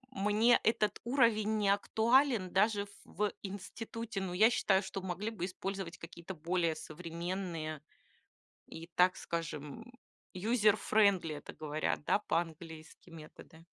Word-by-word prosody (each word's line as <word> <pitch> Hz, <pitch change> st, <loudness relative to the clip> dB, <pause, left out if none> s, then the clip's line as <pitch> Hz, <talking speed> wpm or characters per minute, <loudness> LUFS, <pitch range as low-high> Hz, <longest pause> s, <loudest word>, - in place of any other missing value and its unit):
Мне 210 Hz, +4 st, +4 dB
этот 215 Hz, -3 st, +1 dB
уровень 230 Hz, -4 st, +3 dB
не 205 Hz, -2 st, +2 dB
актуален 220 Hz, +1 st, +3 dB
даже 205 Hz, +1 st, +3 dB
ф 200 Hz, -, -13 dB
в 210 Hz, -1 st, -2 dB
институте. 205 Hz, +2 st, -6 dB
Но 185 Hz, -2 st, -3 dB
я 215 Hz, +6 st, +5 dB
считаю, 195 Hz, -4 st, +2 dB
что 190 Hz, 0 st, -5 dB
могли 190 Hz, +4 st, -3 dB
бы 200 Hz, -6 st, -3 dB
использовать 190 Hz, -1 st, -5 dB
какие-то 170 Hz, +2 st, -9 dB
более 170 Hz, 0 st, 0 dB
современные 165 Hz, -1 st, -5 dB, 0.9 s
и, 165 Hz, +1 st, -9 dB
так 180 Hz, +1 st, +5 dB
скажем, 150 Hz, -, -5 dB, 0.5 s
user 215 Hz, +2 st, +3 dB
friendly, 195 Hz, -9 st, +2 dB
это 145 Hz, -, -10 dB
говорят, 155 Hz, -1 st, -2 dB
да, 200 Hz, -, +2 dB
по-английски, 165 Hz, -3 st, -4 dB
методы. 160 Hz, 0 st, -13 dB
190 Hz, 125 wpm, -33 LUFS, 165-210 Hz, 0.9 s, я